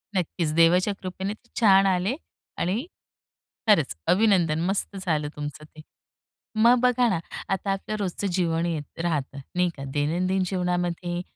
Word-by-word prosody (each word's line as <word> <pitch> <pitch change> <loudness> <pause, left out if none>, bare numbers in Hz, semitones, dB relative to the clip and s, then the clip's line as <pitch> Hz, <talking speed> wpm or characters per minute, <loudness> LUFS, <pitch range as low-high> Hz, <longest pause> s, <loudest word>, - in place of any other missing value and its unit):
नक्कीच, 170 -2 -1
देवाच्या 180 +4 +4
कृपेने 190 +2 -4
ते 235 +2 -21
छान 195 -3 +6
आले. 190 +6 +1 0.4
आणि 210 - -1 0.8
खरंच, 160 - +4
अभिनंदन. 180 -6 +3
मस्त 195 +1 -1
झालं 150 -3 0
तुमचं 150 +1 -6
ते. 155 0 -14 0.8
मग 240 +2 +6
बघा 250 -1 +3
ना, 170 - 0 0.3
आता 195 +1 -1
आपलं 195 +2 -3
रोजचं 200 +1 -2
जीवन 170 -2 +1
येत 160 -2 -4
राहतं 145 -5 -2 0.2
नाही 180 0 +2
का, 135 - -6
दैनंदिन 180 +6 +1
जीवनामध्ये 175 -1 -1
180 Hz, 135 wpm, -25 LUFS, 165-195 Hz, 0.8 s, छान